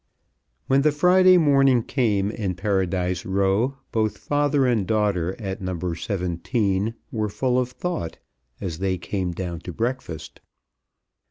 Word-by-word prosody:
When 135 +1 +3
the 150 +1 +4
Friday 185 +4 +5
morning 135 -6 +4
came 105 -7 0
in 100 -5 -3
Paradise 95 -2 0
Row 100 +7 +1
both 110 -1 0
father 145 -1 +1
and 115 -7 +1
daughter, 100 -5 +1
at 95 -2 -5
No. 90 -2 -3
17, 95 +4 -1 0.2
were 110 -2 -1
full 125 +5 +1
of 125 -1 -1
thought 125 - -4 0.4
as 90 -5 -4
they 95 -1 0
came 90 0 -3
down 85 -1 -4
to 90 - -7
breakfast. 115 - -4
105 Hz, 135 wpm, -24 LUFS, 95-130 Hz, 0.4 s, Friday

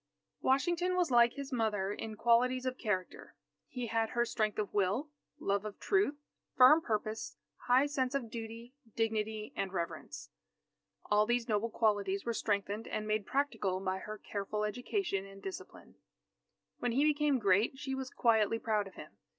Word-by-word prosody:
Washington 345 +7 +2
was 355 -6 +1
like 240 -1 +6
his 280 -1 -6
mother 210 -4 0
in 220 +1 -6
qualities 250 +3 +3
of 255 0 -2
character. 190 -5 -3 0.3
He 250 -2 -4
had 225 0 0
her 240 -1 +1
strength 215 -2 -1
of 210 -2 -2
will, 210 +10 0 0.3
love 200 0 0
of 215 -1 -7
truth, 395 -7 +2 0.4
firm 260 +5 +8
purpose, 215 -3 -3 0.3
high 255 +3 +5
sense 270 -2 -1
of 240 -5 -2
duty, 230 +2 -7 0.2
dignity, 220 -1 -1
and 195 -1 -2
reverence. 170 -3 -5 0.8
All 210 0 +4
these 240 0 +1
noble 215 0 0
qualities 205 -3 +1
were 235 - 0
strengthened 205 0 -1
and 215 0 -3
made 215 -1 0
practical 230 -9 0
by 190 0 -2
her 215 +2 -7
careful 205 +1 -3
education 245 - -1
and 195 0 -12
discipline. 380 - -9 0.9
When 245 -1 0
he 275 +4 +3
became 300 -2 +3
great, 205 +3 +2
she 270 -1 -4
was 265 -1 -4
quietly 225 -2 +3
proud 215 -3 0
of 195 - -14
him. - - -11
225 Hz, 160 wpm, -33 LUFS, 210-255 Hz, 0.9 s, firm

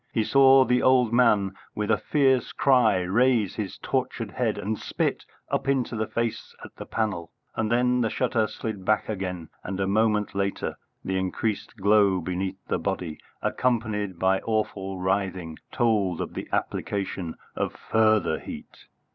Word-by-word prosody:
He 110 - +1
saw 135 +1 +6
the 125 0 +2
old 125 -3 +4
man, 105 -6 +4 0.2
with 105 0 -1
a 105 - +4
fierce 135 -2 +2
cry, 125 -8 +4
raise 110 +2 +2
his 105 -4 -5
tortured - - -2
head - - -1
and 110 +3 -2
spit - - -2 0.3
up 135 - -1
into 130 -3 0
the 110 -1 -1
face 115 -1 -3
at - - -14
the - - -9
panel, 95 -7 -2 0.2
and 110 0 -1
then 125 +1 +3
the 115 - +1
shutter 115 -3 +1
slid 110 -2 -5
back 105 +2 +1
again, 90 -6 -4
and 95 +1 -4
a 95 - +1
moment 105 +1 +1
later 100 0 -2 0.3
the 95 0 0
increased 100 +4 -2
glow 100 -1 +4
beneath 95 +2 -3
the - - 0
body, 90 -5 -3 0.2
accompanied 110 -6 0
by 95 +2 +2
awful 100 -4 -2
writhing, 95 -3 -2
told 105 -8 +1
of - - -4
the - - -6
application 95 -4 -2 0.2
of - - -1
further 110 -1 +2
heat. - - -10
105 Hz, 155 wpm, -26 LUFS, 95-115 Hz, 0.3 s, saw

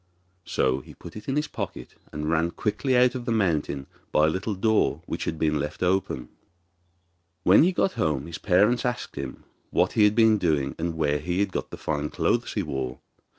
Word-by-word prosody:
So 65 0 +1
he - - -14
put - - -11
it 105 0 -9
in 135 - 0
his 150 0 0
pocket, - - -6 0.2
and 75 0 -4
ran 85 +1 +2
quickly 110 +8 -1
away 125 0 +6
out 125 - +1
of 125 -2 -5
the 120 - -1
mountain 80 -10 0 0.3
by 75 - +4
a - - +3
little 100 +4 -2
door 110 +3 +1
which - - -4
had 80 - -2
been 75 -1 +1
left 75 +4 -3
open. 90 -8 0 1.1
When 95 - +7
he 175 +4 +4
got 190 +1 +1
home 75 - -1
his 85 0 -7
parents 105 +6 +3
asked 125 -1 -3
him 70 -2 -6 0.3
what - - +2
he 105 - +5
had 105 0 +3
been 110 -2 +5
doing 70 -6 +1
and 85 0 -2
where 75 -2 +1
he 90 +4 -2
had 100 -1 +1
got - - -3
the - - -8
fine 75 -1 -2
clothes - - 0
he - - -1
wore. 65 -2 -4
90 Hz, 210 wpm, -26 LUFS, 75-110 Hz, 1.1 s, When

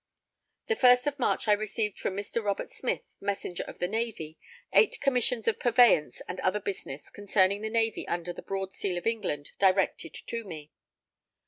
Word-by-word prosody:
The 455 - +1
first 250 - +6
of 290 -1 -2
March 240 - 0
I - - +5
received 210 0 0
from 190 - -2
Mr. 205 +3 -3
Robert 200 -1 -2
Smith, - - -2 0.2
Messenger 195 -3 -3
of - - -9
the 180 - -1
Navy, 210 -7 -3 0.3
8 440 - +4
commissions 250 -4 +1
of 225 - +1
purveyance 235 - +4
and 180 - -5
other 200 +3 +1
business 185 -8 -6
concerning 200 0 +2
the 220 - -2
Navy 225 -1 0
under 175 0 -2
the - - -9
Broad 195 0 -4
Seal 185 -3 -2
of 175 - -5
England 205 -11 -2
directed 190 -4 +2
to 230 0 -5
me. 155 -6 -9
205 Hz, 175 wpm, -29 LUFS, 185-230 Hz, 0.3 s, first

